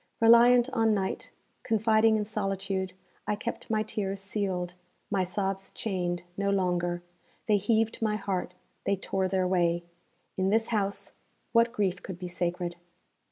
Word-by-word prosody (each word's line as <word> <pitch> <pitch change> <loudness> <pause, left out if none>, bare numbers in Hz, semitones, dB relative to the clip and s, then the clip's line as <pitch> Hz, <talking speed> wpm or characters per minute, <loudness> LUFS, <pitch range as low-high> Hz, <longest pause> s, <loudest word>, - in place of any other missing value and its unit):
Reliant 235 +2 +7
on 225 -3 +3
night, 190 -1 -2 0.3
confiding 220 0 +3
in 210 - -1
solitude, 195 -2 -2 0.3
I 210 - +1
kept - - -5
my 215 -1 +2
tears 200 -2 -3
sealed, 190 -3 -2 0.4
my 195 -2 +2
sobs 195 +1 -2
chained, 180 -4 -2
no 200 +1 0
longer. 175 -2 0 0.4
They 210 -2 +5
heaved 225 +3 +1
my 215 -1 +1
heart; 195 -3 -3 0.3
they 200 - +2
tore 190 0 -1
their 185 -1 +1
way. 175 -2 +2 0.5
In 190 0 +2
this 225 +2 +2
house, 200 -3 -1 0.4
what 230 0 +4
grief 195 -5 0
could 190 -3 -7
be 180 0 -5
sacred! 175 0 -2
195 Hz, 145 wpm, -29 LUFS, 185-215 Hz, 0.5 s, Reliant